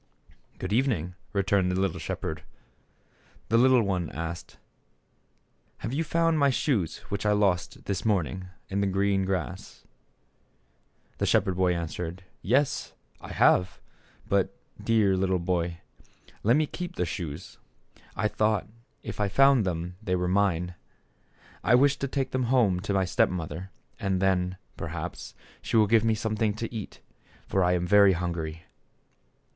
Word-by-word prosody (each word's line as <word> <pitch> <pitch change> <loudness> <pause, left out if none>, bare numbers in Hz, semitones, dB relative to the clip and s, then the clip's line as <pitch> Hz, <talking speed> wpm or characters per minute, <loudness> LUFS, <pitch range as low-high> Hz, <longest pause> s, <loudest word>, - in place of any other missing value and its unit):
"Good 95 +2 -3
evening," 110 - +1 0.2
returned 100 -2 +2
the 90 - 0
little 95 -3 0
shep - - -5
herd. 80 -1 -3 1.1
The 115 - +4
little 130 -1 +5
one 90 -5 -1
asked, 85 +1 -6 1.2
"Have 115 - -5
you 155 +4 0
found 165 0 +1
my 140 -1 +5
shoes 125 - 0
which 100 - -3
I 105 0 +3
lost, 95 -5 0
this 100 -2 -2
morning, 95 -3 0 0.2
in 100 +1 -1
the 100 - +1
green 95 0 +1
grass? 90 -8 -4 0.7
" 65 0 -40
The - - +1
shepherd 95 -2 +2
boy 90 -1 +2
answered, 85 +2 -5 0.2
"Yes, 130 +7 +1 0.3
I - - -9
have; 90 0 +3 0.5
but, - - +1 0.3
dear 110 -4 +3
little 95 0 +1
boy, 85 -1 -2 0.6
let 115 +4 +4
me 155 +1 +3
keep 175 +3 -6
the 90 - 0
shoes; 85 -1 -6 0.6
I 105 - +1
thought 105 -1 0 0.4
if - - -7
I 105 -1 +1
found 135 0 +5
them 90 +1 -3
they 95 -4 0
were 90 0 0
mine. 90 -2 +1 0.9
I 120 - +5
wish 140 +2 +4
to 140 - -2
take 135 -1 -2
them 130 -1 0
home 115 -7 +3
to 100 +2 -3
my 95 -1 +2
step 90 - +2
mother, 90 +1 -5 0.3
and 95 -1 0
then, 90 -1 +1 0.2
perhaps, - - -6 0.3
she - - 0
will 110 - +6
give 110 +1 +4
me 110 -1 +2
something 110 -1 -1
to 115 +2 -5
eat, 110 -4 -7 0.4
for 95 - +1
I 90 0 +3
am 90 -1 0
very 100 +1 +6
hungry." 85 -2 -3
95 Hz, 155 wpm, -27 LUFS, 90-110 Hz, 1.2 s, will